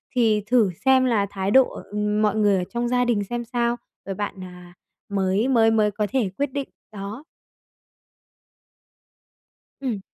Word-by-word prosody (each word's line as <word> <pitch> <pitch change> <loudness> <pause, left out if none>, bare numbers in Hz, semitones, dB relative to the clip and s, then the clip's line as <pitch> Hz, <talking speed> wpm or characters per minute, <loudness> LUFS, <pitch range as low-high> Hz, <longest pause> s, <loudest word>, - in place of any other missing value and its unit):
thì 220 -4 +3
thử 235 -4 +4 0.2
xem 260 -1 +5
là 225 -5 +2
thái 195 0 -3
độ, 260 +2 +6 0.2
ừm, 210 0 0
mọi 210 -1 +2
người 205 -2 +3
ở 180 - -1
trong 240 0 -2
gia 245 0 +2
đình 225 -4 +1
xem 240 +4 -4
sao, 235 0 0 0.3
rồi 195 - -4
bạn, 200 -1 -5
à, 180 -1 -12 0.4
mới 195 +3 +1
mới 230 -4 +4
mới 215 -2 +2
có 210 +1 -2
thể 245 -7 +1
quyết 285 -1 -1
định. 280 -1 -3 0.2
Đó. 210 +5 -7 2.6
Ừm. 245 -7 -2
215 Hz, 160 wpm, -23 LUFS, 200-240 Hz, 2.6 s, độ